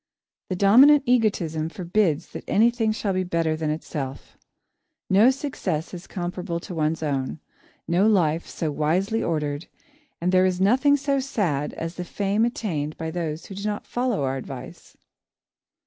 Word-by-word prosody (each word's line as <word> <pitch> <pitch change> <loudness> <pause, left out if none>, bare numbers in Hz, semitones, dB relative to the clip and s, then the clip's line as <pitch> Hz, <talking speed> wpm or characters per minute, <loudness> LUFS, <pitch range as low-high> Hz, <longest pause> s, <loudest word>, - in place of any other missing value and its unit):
The 185 - -1
dominant 260 +10 +7
egotism 180 -10 +1
forbids 175 -2 0
that - - -8
anything 230 0 +3
shall 210 -2 -1
be 185 0 0
better 165 -3 0
than 155 -1 -2
itself. 145 -3 -5 0.8
No 205 +6 +6
success 230 - -3
is 180 0 -8
comparable 175 -1 -4
to 185 - -8
one's 160 0 -1
own, 140 0 -2 0.5
no 175 +5 +3
life 170 -6 +2
so 160 -2 -3
wisely 185 +10 0
ordered, 150 -3 -2 0.5
and 180 +2 0
there 185 0 +5
is 180 -1 -1
nothing 260 +9 +4
so 280 0 0
sad 180 - -1
as 165 +1 -5
the 180 - -3
fame 200 +4 0
attained 160 -11 -3
by 160 0 -4
those 165 -2 -4
who - - -9
do 200 +1 -7
not 210 0 -3
follow 245 - -1
our 135 0 -1
advice. 130 - -9
180 Hz, 155 wpm, -24 LUFS, 160-215 Hz, 0.8 s, dominant